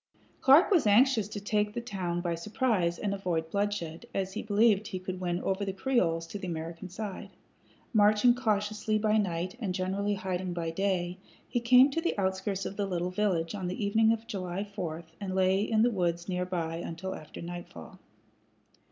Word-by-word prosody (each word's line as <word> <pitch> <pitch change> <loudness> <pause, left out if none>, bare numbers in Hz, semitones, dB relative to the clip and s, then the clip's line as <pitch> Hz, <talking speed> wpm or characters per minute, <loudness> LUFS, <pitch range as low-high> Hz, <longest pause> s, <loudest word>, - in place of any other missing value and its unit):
Clark 290 +10 +6
was 335 - +4
anxious 225 0 +5
to 210 0 -6
take 210 +1 0
the - - -1
town 185 -7 -3
by 175 -1 -1
surprise 180 -1 0
and 200 -1 -2
avoid 170 -5 -2
bloodshed, 200 -5 -2
as 190 -1 -1
he - - -3
believed 210 0 +3
he 185 - -4
could 185 0 -5
win 175 -1 -1
over 195 +1 0
the 195 - -1
Creoles 185 -8 +1
to 200 +5 -7
the 190 - -5
American 165 +2 -5
side. 200 +1 -6 0.6
Marching 210 +2 +5
cautiously 215 -2 0
by 215 0 +2
night 185 -1 -1
and 195 -6 -2
generally 200 +2 -1
hiding 185 -1 -3
by 165 -1 -2
day, 180 0 -1 0.3
he 240 - 0
came 250 +3 +6
to 330 - -1
the 340 - -1
outskirts 190 0 -1
of 195 - -5
the 200 -1 0
little 180 -1 -2
village 180 -4 0
on 190 -3 -3
the 185 +3 -2
evening 220 +2 +4
of 225 0 -2
July 190 -3 -3
4, 170 -5 -5 0.2
and 190 -2 -4
lay 190 +1 +3
in 220 +1 +2
the 240 - +3
woods 175 -4 -1
near 180 -1 -1
by 165 -3 -2
until 170 +2 -5
after 155 - -10
nightfall. 175 +2 -8
195 Hz, 185 wpm, -29 LUFS, 175-210 Hz, 0.6 s, Clark